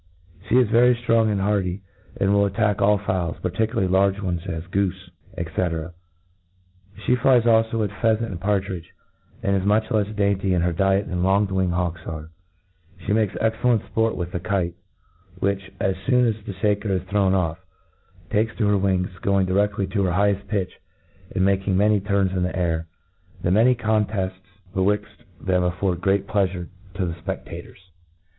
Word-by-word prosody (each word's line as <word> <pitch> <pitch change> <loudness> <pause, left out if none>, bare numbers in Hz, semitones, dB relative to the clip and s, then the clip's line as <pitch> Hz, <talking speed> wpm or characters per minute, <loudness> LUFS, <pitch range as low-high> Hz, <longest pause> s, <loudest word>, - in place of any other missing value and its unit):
She 120 - +4
is 125 -3 +5
very 120 +3 +5
ftrong 115 -2 +2
and 100 - 0
hardy, 95 -1 0 0.4
and 100 +1 +2
will 100 0 +4
attack 105 +1 0
all 105 +1 +4
fowls, 95 -4 -2
particularly 95 +1 0
large 95 +1 +2
ones, 90 -4 -2
as 80 -2 -4
goofe, 95 0 -2 0.3
&C4 85 0 -2 1.1
She 125 - +4
flies 125 -1 +4
alfo 115 -1 +3
at - - -12
pheafent 110 +3 +1
and 90 -2 -7
partridge 95 -4 -1
j - - -24 0.5
and 100 - +2
is 95 - 0
much 105 +2 +1
lefs 105 -1 0
dainty 100 -2 +1
in 85 - +1
her 90 0 +1
diet 95 +3 +2
than 90 -1 -2
k>ng 95 +2 +2
winged 95 -2 0
hawks 85 -2 -2
are* 80 0 -6 0.7
She 90 - -5
rnakcs 105 -2 +1
cxccU 110 0 -1
lent 120 -4 +3
fport 115 0 +1
with 90 -1 -4
the 90 - -3
kite, 90 -2 -1 0.6
which, 100 0 -2
as 95 -1 +1
foon 125 -1 +4
as 110 -2 -1
the 100 - -5
faker 105 +1 0
is 95 -3 0
thrown 95 0 +1
off, 85 -2 -1 0.7
takes 110 +1 +1
to 110 - 0
her 105 - +3
wings, 95 -1 +1
gomg 100 -1 +2
direaiy 100 0 0
to 100 - +1
her 90 - 0
higbeft 100 +1 +1
pitch, 100 -3 -3 0.6
and 95 - +2
making 95 -1 +1
many 105 +1 +4
turns 100 -1 +1
in 95 -1 -1
the 90 +1 -1
air. 85 -2 -1 0.6
The 90 - +1
many 115 +6 +5
contefts 105 -4 -1 0.3
betwixt 105 +2 -1
them 90 -1 +1
afibrd 90 0 -1
great 95 +1 +1
pleafure 95 -4 -1 0.3
to 95 -2 -1
the 85 - -3
fpc^ators. 90 +3 -7
100 Hz, 175 wpm, -23 LUFS, 90-105 Hz, 1.1 s, is